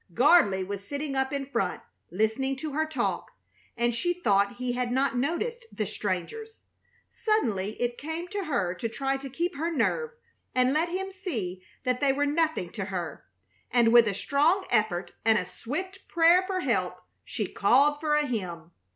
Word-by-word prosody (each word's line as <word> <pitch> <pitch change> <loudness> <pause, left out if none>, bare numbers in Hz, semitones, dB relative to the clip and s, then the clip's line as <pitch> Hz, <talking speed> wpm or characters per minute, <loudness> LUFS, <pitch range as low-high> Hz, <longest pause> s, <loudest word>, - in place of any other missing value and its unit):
Gardley 245 - +5
was 200 0 -5
sitting 285 -1 -3
up 265 0 0
in 280 -1 -2
front, 235 -9 -1 0.3
listening 220 +8 0
to 300 +3 -5
her 315 +2 0
talk, 315 - -2 0.5
and 240 0 +1
she 350 +9 0
thought 200 - +2
he 250 0 -2
had 245 0 -1
not 265 +1 +1
noticed 445 - -2
the 215 - -2
strangers. 210 - -4 0.5
Suddenly 220 - 0
it 240 0 -1
came 320 +4 -4
to 400 -1 -3
her 200 - 0
to 230 +5 -4
try 270 +3 -1
to 270 0 -8
keep 340 +7 -2
her 325 +3 -1
nerve 465 - 0 0.5
and 255 +1 +3
let 325 +3 +1
him 385 +2 -3
see 230 - -4 0.2
that 250 0 0
they 275 -2 +4
were 285 +1 +1
nothing 305 - 0
to 200 -4 -4
her; 180 -4 -5 0.4
and 235 -2 +4
with 235 -2 +8
a 200 - -1
strong 315 - +2
effort 195 -6 +1
and 220 -1 +4
a 185 - -1
swift 370 - -6
prayer 340 +2 +5
for 375 -1 -1
help - - -1 0.2
she - - -3
called 290 +1 +3
for 300 -1 +1
a 300 0 +2
hymn. 175 - -4
270 Hz, 175 wpm, -28 LUFS, 215-330 Hz, 0.5 s, with